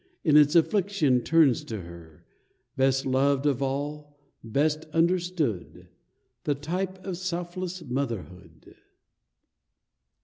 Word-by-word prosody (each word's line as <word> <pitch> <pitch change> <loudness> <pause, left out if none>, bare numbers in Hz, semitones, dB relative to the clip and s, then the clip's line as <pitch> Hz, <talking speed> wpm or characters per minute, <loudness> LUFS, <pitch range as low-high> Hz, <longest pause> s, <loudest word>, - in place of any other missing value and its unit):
In 150 -3 +3
its 150 +1 +6
affliction 170 - +2
turns 155 -4 +3
to 110 -4 -5
her 85 -2 -13 0.3
— - - -46
Best 135 0 +2
loved 135 +1 +2
of 140 -3 +1
all, 145 +2 -4 0.3
best 150 +7 0
understood. 170 - -1 0.5
The 145 - 0
type 180 +6 -3
of 185 -3 -4
selfless 180 0 -4
motherhood 100 - -6
145 Hz, 105 wpm, -27 LUFS, 130-170 Hz, 0.5 s, its